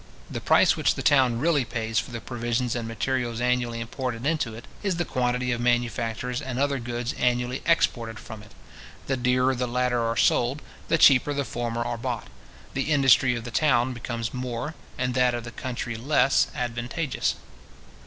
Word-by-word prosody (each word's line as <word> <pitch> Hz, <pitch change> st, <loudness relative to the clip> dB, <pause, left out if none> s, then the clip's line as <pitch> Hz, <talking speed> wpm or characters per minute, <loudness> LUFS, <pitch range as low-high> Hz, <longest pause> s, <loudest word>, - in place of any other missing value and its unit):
The -, -, -4 dB
price -, -, +4 dB
which -, -, +1 dB
the -, -, -5 dB
town 130 Hz, -5 st, +4 dB
really 150 Hz, +1 st, +2 dB
pays 115 Hz, -1 st, -1 dB
for -, -, -5 dB
the 120 Hz, -1 st, -5 dB
provisions 120 Hz, +1 st, -2 dB
and 115 Hz, -2 st, -3 dB
materials 120 Hz, 0 st, -2 dB
annually 120 Hz, -1 st, 0 dB
imported 120 Hz, +1 st, -4 dB
into 145 Hz, -8 st, 0 dB
it, 115 Hz, -, -10 dB, 0.2 s
is 195 Hz, -3 st, 0 dB
the 175 Hz, 0 st, -1 dB
quantity 125 Hz, 0 st, 0 dB
of 120 Hz, -1 st, -1 dB
manufactures 120 Hz, 0 st, 0 dB
and 125 Hz, -2 st, -5 dB
other 140 Hz, 0 st, +1 dB
goods 120 Hz, +1 st, -3 dB
annually 125 Hz, +1 st, 0 dB
exported 115 Hz, -9 st, +1 dB
from 110 Hz, +2 st, -9 dB
it. 105 Hz, -, -15 dB, 0.6 s
The 135 Hz, -, 0 dB
dearer 125 Hz, +1 st, +2 dB
the 125 Hz, 0 st, -2 dB
latter 125 Hz, 0 st, 0 dB
are 115 Hz, 0 st, -1 dB
sold, 130 Hz, +5 st, +2 dB, 0.2 s
the 165 Hz, -, +3 dB
cheaper 145 Hz, 0 st, +5 dB
the 140 Hz, -1 st, -1 dB
former 120 Hz, 0 st, -3 dB
are 120 Hz, -1 st, -3 dB
bought. -, -, -4 dB, 0.4 s
The 135 Hz, +3 st, -1 dB
industry 135 Hz, -3 st, +5 dB
of 120 Hz, -, -5 dB
the 120 Hz, -, -7 dB
town 125 Hz, -2 st, +2 dB
becomes 115 Hz, -1 st, -4 dB
more, 125 Hz, +3 st, -4 dB, 0.2 s
and 125 Hz, 0 st, -1 dB
that 125 Hz, -1 st, +3 dB
of 120 Hz, -, -4 dB
the 120 Hz, -, -8 dB
country 120 Hz, -1 st, -4 dB
less 135 Hz, +3 st, +3 dB
advantageous. 125 Hz, +5 st, -2 dB
125 Hz, 180 wpm, -26 LUFS, 120-130 Hz, 0.6 s, cheaper